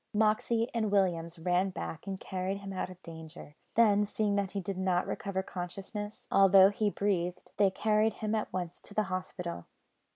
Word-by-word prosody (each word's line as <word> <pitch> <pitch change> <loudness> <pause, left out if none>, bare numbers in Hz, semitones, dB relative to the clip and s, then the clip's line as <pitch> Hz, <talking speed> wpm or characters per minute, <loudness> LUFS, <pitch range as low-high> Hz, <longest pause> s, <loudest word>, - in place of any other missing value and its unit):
Moxey 220 +2 +2
and 220 -3 0
Williams 175 -4 +1
ran 180 +3 +1
back, 165 -2 -6
and 190 -1 -3
carried 190 +1 -3
him 195 -1 -7
out 185 - -3
of 185 -1 -11
danger. 160 -2 -10 0.2
Then, 210 -3 +5
seeing 205 0 0
that 200 -1 0
he 200 - -1
did 190 0 -4
not 185 -1 +1
recover 190 -1 -3
consciousness, 195 +4 -6
although 195 0 +7
he 210 +1 +1
breathed, 180 -3 -1
they 200 -1 +5
carried 215 +2 +2
him 215 0 -3
at 215 -1 -1
once 180 -2 -4
to 205 - -10
the 215 - +3
hospital. 180 - -4
195 Hz, 175 wpm, -31 LUFS, 180-210 Hz, 0.2 s, although